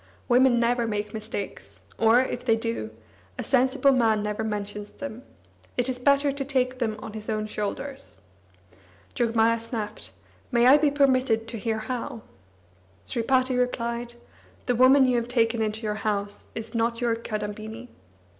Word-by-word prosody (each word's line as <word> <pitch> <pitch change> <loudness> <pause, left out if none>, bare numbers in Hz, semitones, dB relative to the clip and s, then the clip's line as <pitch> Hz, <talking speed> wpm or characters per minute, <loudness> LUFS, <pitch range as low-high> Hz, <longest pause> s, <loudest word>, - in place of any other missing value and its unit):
Women 250 -1 +5
never 235 0 +1
make 210 0 -3
mistakes, 200 - -6 0.2
or, 225 +2 +5
if 260 - -3
they 230 -3 +3
do, 225 - -3 0.5
a - - -3
sensible 265 +1 +3
man 225 -5 +2
never 210 +1 -2
mentions 205 -1 -4
them; 255 -4 -8 0.6
it 245 0 +1
is 255 -1 -2
better 280 +2 +3
to 275 0 -3
take 255 -2 0
them 220 -4 -1
on 215 - -7
his 215 0 -6
own 215 -1 -1
shoulders. 215 - -5 0.9
Jogmaya 230 -1 +2
snapped: 225 -2 -5 0.4
"May 240 -1 +4
I 275 +4 +8
be 295 0 +3
permitted 255 -5 +2
to 230 - -5
hear 220 0 -1
how?" 230 0 -5 0.8
Sripati 255 +2 +1
replied: 240 -1 -2 0.5
"The 250 - +1
woman 260 +3 +6
you 250 -1 +2
have 235 0 -1
taken 230 -2 +1
into 220 +1 -2
your 210 -1 -1
house 205 -1 -2
is 225 +1 -6
not 230 0 0
your 235 -2 +1
Kadambini." 220 +1 -6
230 Hz, 155 wpm, -26 LUFS, 220-255 Hz, 0.9 s, I